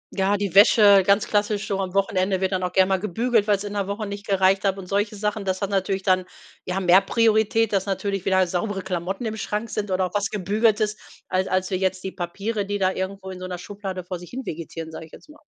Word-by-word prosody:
Ja, 195 +1 +2
die 200 -3 -3
Wäsche, 200 -1 +7
ganz 200 +2 +3
klassisch 205 0 0
schon 195 -1 -2
am 185 0 -5
Wochenende, 190 -1 +1
wird 190 0 0
dann 185 -1 -1
auch 180 0 -2
gerne 190 +1 +3
mal 190 -1 +2
gebügelt, 220 +2 0
weil 205 - +4
es 200 - -6
in 205 0 -6
der 200 -1 -2
Woche 205 +2 -3
nicht 200 0 -7
gereicht 195 0 +3
hat 195 -1 +1
und 190 - -8
solche 205 +3 -1
Sachen. 210 0 -2
Das 190 0 -2
hat 200 - -2
natürlich 195 0 -1
dann 185 -2 +2 0.4
ja 185 +1 -2
mehr 185 +1 +5
Priorität, 220 0 +2
dass 195 0 0
natürlich 195 0 -2
wieder 190 -1 +3
saubere 185 +2 -3
Klamotten 190 +4 -3
im 220 0 -3
Schrank 210 +2 -3
sind 210 -1 -3
oder 185 0 +1
auch 180 - -6
was 205 -1 0
Gebügeltes, 210 +2 +1 0.3
als 185 +1 0
als 185 +1 -1
wie - - +1
jetzt 185 0 -1
die 190 - -4
Papiere, 200 +5 -3
die 205 0 -1
da 190 -1 +2
irgendwo 190 0 -5
in 185 - -8
so 185 - -6
'ner 180 -1 -5
Schublade 190 0 -6
vor 180 0 -6
sich 175 - -12
hin 260 +1 -6
vegetieren, 160 0 -6
sage 160 0 -8
ich - - -25
jetzt - - -15
mal. 300 - -16
195 Hz, 250 wpm, -23 LUFS, 185-205 Hz, 0.4 s, Wäsche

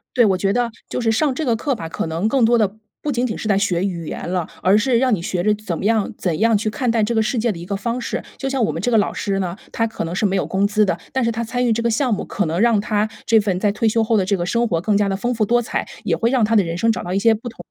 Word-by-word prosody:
对， 240 - +5
我 190 -3 +2
觉 195 +1 +1
得 240 +1 0 0.2
就 - - -3
是 225 -2 +1
上 265 +4 +1
这 315 - -3
个 235 -4 +1
课 275 +4 -1
吧， 165 -8 -6
可 165 - -3
能 165 +6 -1
更 255 +1 +2
多 235 +2 +4
的 210 -4 +2 0.3
不 295 - -1
仅 245 -1 0
仅 220 - -3
是 215 - -4
在 195 -1 +3
学 190 -2 0
语 170 -4 -3
言 - - -5
了， 180 -3 -1 0.2
而 190 +3 +5
是 240 +2 +2
让 255 -1 +2
你 190 - +1
学 175 +1 -2
着 210 - +3
怎 205 -5 -4
么 190 - -5
样 220 -1 +1
怎 170 -4 -2
样 225 0 +3
去 215 +1 -1
看 245 +4 -2
待 230 -1 +2
这 225 +3 0
个 220 - +4
世 230 +4 0
界 235 +1 +1
的 180 - -4
一 170 - -8
个 200 - -3
方 235 +4 -2
式。 235 - -3 0.2
就 270 - -2
像 265 -3 0
我 205 - 0
们 160 - -4
这 245 +6 -1
个 225 - +5
老 205 - +1
师 195 -1 -2
呢， 180 -1 -3 0.2
他 225 - 0
可 220 - -5
能 165 +1 -4
是 200 - -1
没 195 -1 +2
有 - - 0
工 195 +1 +1
资 210 0 +3
的， 185 -3 0 0.2
但 265 -1 0
是 230 - +1
他 230 - -3
参 245 +2 -1
与 230 - +3
这 230 +1 0
个 235 - +1
项 240 +1 +1
目， - - -4
可 205 - -2
能 165 +4 -1
让 230 -3 +4
他 210 +1 0 0.2
这 225 -1 +5
份 195 -3 -1
在 205 0 +1
退 225 +2 +1
休 225 +1 +2
后 225 0 +2
的 195 - +2
这 200 +1 +1
个 175 0 -3
生 235 +5 +1
活 165 -5 0
更 200 +3 +1
加 205 -1 +2
地 195 - -1
丰 240 +5 -1
富 220 - +1
多 240 +3 +2
彩， 235 - -2 0.2
也 - - +1
会 230 - +1
让 250 -4 +3
他 220 +2 +1
的 210 - +5
人 170 0 -4
生 225 +4 +3
找 - - -4
到 180 - -5
一 195 - +1
些 225 +2 +4
不 230 +3 -6
同 230 - -12
215 Hz, 375 characters per minute, -20 LUFS, 195-235 Hz, 0.3 s, 对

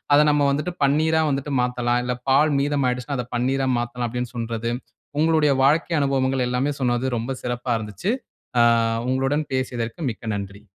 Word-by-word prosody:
அத - - +6
நம்ம 145 -1 +3
வந்துட்டு 150 +5 -2
பன்னீரா 160 +3 +2
வந்துட்டு 140 +1 -2
மாத்தாலாம் 125 0 0
இல்ல 125 0 -1
பால் 145 +3 +4
மீதம் 140 -1 +1
ஆயிடுச்சுன்னா, 125 +3 -3
அத 120 - -3
பன்னீரா 135 +2 0
மாத்தாலாம் 120 0 -3
அப்டின் 125 +1 -4
சொல்றது. 115 0 -3 0.5
உங்களுடைய 155 -2 +3
வாழ்க்கை 155 +5 +3
அனுபவங்கள் 135 -1 +1
எல்லாமே 125 +4 0
சொன்னது 125 -1 0
ரொம்ப 115 +4 -3
சிறப்பா 120 0 -3
இருந்துச்சு. 110 - -4 0.5
ஆ, - - +7 0.5
உங்களுடன் 135 +4 0
பேசியதற்கு 125 0 -3
மிக்க 110 - -10
நன்றி. 100 +1 -7
130 Hz, 155 wpm, -23 LUFS, 120-145 Hz, 0.5 s, ஆ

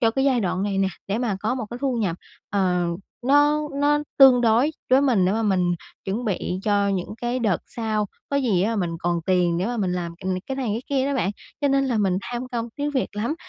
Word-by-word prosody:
cho 225 -2 +4
cái 270 +3 0
giai 260 -4 +3
đoạn 185 0 -1
này 200 -1 -1
nè, 195 - +2 0.2
để 205 +3 0
mà 230 -6 -1
có 220 +4 0
một 245 -4 -4
cái 240 - -6
thu 260 -3 +1
nhập, 190 -7 -1 0.3
ờ, 180 -3 +1 0.4
nó 290 +2 +4 0.2
nó 295 +1 +3 0.2
tương 260 -3 +8
đối 235 +6 +3 0.2
với 260 - +6
mình, 235 -10 +3
để 185 - +2
mà 225 +1 0
mình 185 -4 +2 0.3
chuẩn 215 +6 -2
bị 185 -3 -2
cho 205 -1 +2
những 195 +1 -2
cái 240 +1 0
đợt 210 -8 +1
sau, 215 -2 -2 0.2
có 280 - +1
gì 225 -10 +2
á 225 +2 0
mình 175 -4 0
còn 175 -1 0
tiền 180 -2 +2
để 185 - 0
mà 240 +1 -2
mình 190 -4 0
làm, 175 -2 -3
ừm, 190 -1 0
cái 265 - -3
này 265 - -2
cái 230 +4 -3
kia 270 -1 +1
đó 280 - -1
bạn. 245 -7 +1 0.3
Cho 285 - +2
nên 275 0 +3
là 240 -4 0
mình 190 -2 +2
tham 245 +3 -5
công 235 -1 -3
tiếc 290 0 -1
việc 260 - +1
lắm, 235 +9 -1
225 Hz, 250 wpm, -23 LUFS, 190-260 Hz, 0.4 s, tương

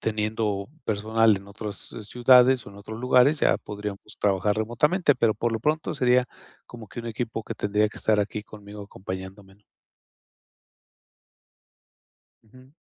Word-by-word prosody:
teniendo 105 -2 -2 0.2
personal 110 +1 +2
en 100 +1 -10
otras 105 0 -6 0.3
ciudades 125 +2 +4
o - - -9
en 100 - -14
otros 110 +3 -8
lugares, 130 +4 +4
ya - - +4
podríamos 105 0 -8
trabajar 100 +1 +2
remotamente. 145 - +2
Pero 115 -3 +2
por 120 +3 -1
lo 110 - -2
pronto 155 +4 0
sería 125 -2 +3 0.4
como 115 -3 -11
que 120 - -7
un 115 - -8
equipo 115 0 -4
que - - -6
tendría 105 +1 +1
que - - -14
estar 110 -1 +2
aquí 105 +1 -3
conmigo 105 -1 -11
acompañándome, 95 0 -8
¿no? 105 - -33 2.8
Ujú. 130 +4 -19
110 Hz, 145 wpm, -25 LUFS, 105-120 Hz, 2.8 s, ciudades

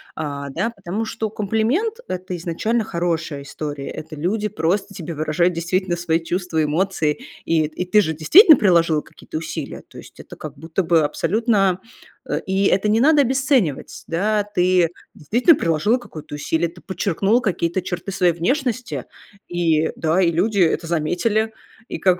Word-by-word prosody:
а, 140 -2 -4
да, 225 - -1
потому 200 0 -4
что 220 -1 -3
комплимент- 225 - 0
это 185 0 -4
изначально 215 +8 -1
хорошая 165 -5 -2
история. 145 -1 -6
Это 155 0 -8
люди 200 +8 -1
просто 195 +2 -1
тебе 170 -2 -6
выражают 155 +4 +1
действительно 175 +2 -1
свои 170 -1 0
чувства, 175 -2 -1
эмоции, 155 -1 0 0.3
и 165 -1 +2
и 155 +4 -4
ты 210 +4 +4
же 160 -5 -1
действительно 310 - +8
приложила 170 -7 +3
какие-то 155 - -9
усилия. 160 -2 -6
То - - -15
есть - - -15
это - - -11
как 150 -2 -9
будто 165 +4 -2
бы 165 -1 +3
абсолютно, 195 +3 +1 0.5
э, - - -1
и 190 +1 +1
это 200 +2 +2
не 220 +2 +3
надо 295 +3 +5
обесценивать, 260 - 0
да, 205 +5 +1
ты 180 -4 +2 0.3
действительно 240 - +3
приложила 170 +9 +1
какое-то 155 -10 -9
усилие, 160 +3 0
ты 175 +1 -16
подчеркнула 195 +4 +1
какие-то 180 -3 -1
черты 180 +2 -5
своей 180 -2 +2
внешности 250 - -2 0.4
и, 165 -3 +1
да, 165 +3 +1
и 170 -2 +3
люди 200 +5 0
это 165 -1 +2
заметили. 205 +7 0 0.4
И - - -4
как, 180 -1 +3
180 Hz, 160 wpm, -21 LUFS, 160-210 Hz, 0.5 s, действительно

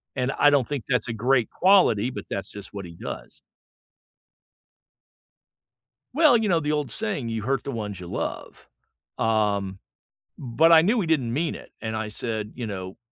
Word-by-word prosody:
and 125 +1 0
I 145 - +7
don't 140 -4 +2
think 145 -5 -4
that's 125 -3 +1
a 115 - -3
great 120 +1 +2
quality, 175 - +4
but 130 - -6
that's 100 - -3
just 100 0 -10
what 100 -2 -6
he 85 -1 -11
does. - - -8 2.7
Well, 300 -5 +6
you 220 -2 0
know, 170 -2 +3
the 150 -1 -1
old 150 -2 -1
saying, 195 - -2
"You 110 -2 -3
hurt 135 +2 -1
the 140 - -4
ones 105 -5 -5
you 90 - -8
love," - - -5 0.5
um, 100 -3 0 0.6
but 140 +6 +3
I 160 -1 +9
knew 220 +7 +2
he 170 - -2
didn't 130 -8 +1
mean 160 +4 -1
it, - - -12
and 110 -1 -3
I 110 -1 -3
said, 105 0 -4
you 120 -2 -4
know, 95 -1 -6
120 Hz, 180 wpm, -25 LUFS, 105-150 Hz, 2.7 s, I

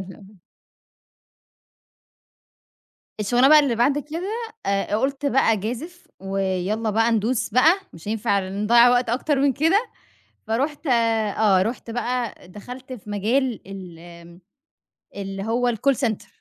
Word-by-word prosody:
لا. 195 +1 -14 2.8
الشغلانة 245 +6 +3
بقى 305 0 +9
اللي 275 -5 0
بعد 255 +5 +2
كده، 330 +8 -5 0.3
آآ، 195 0 +1
ق 215 - +1
قلت 275 +2 -1
بقى 270 -4 +3
أجازف 245 - -5
ويلَّا 195 +3 -2
بقى 225 +2 +2
ندوس 225 +2 0
بقى، 315 - +4
مش 165 +4 -11
هينفع 205 -3 0
نضيع 220 +5 +4
وقت 245 0 +2
أكتر 265 +4 0
من 280 0 +3
كده. 335 - +2 0.6
فرُحت 280 +8 -2
آه، 220 -5 +2
رُحت 230 +3 -4
بقى 240 -4 -3
دخلت 250 +7 -10
في 210 -4 -9
مجال 230 +4 0
ال 190 -4 -9
آمم 170 0 -14 0.8
اللي 195 -1 -5
هو 240 +3 +1
الcall 265 +5 +1
center. 220 -2 -5
230 Hz, 130 wpm, -23 LUFS, 200-260 Hz, 2.8 s, بقى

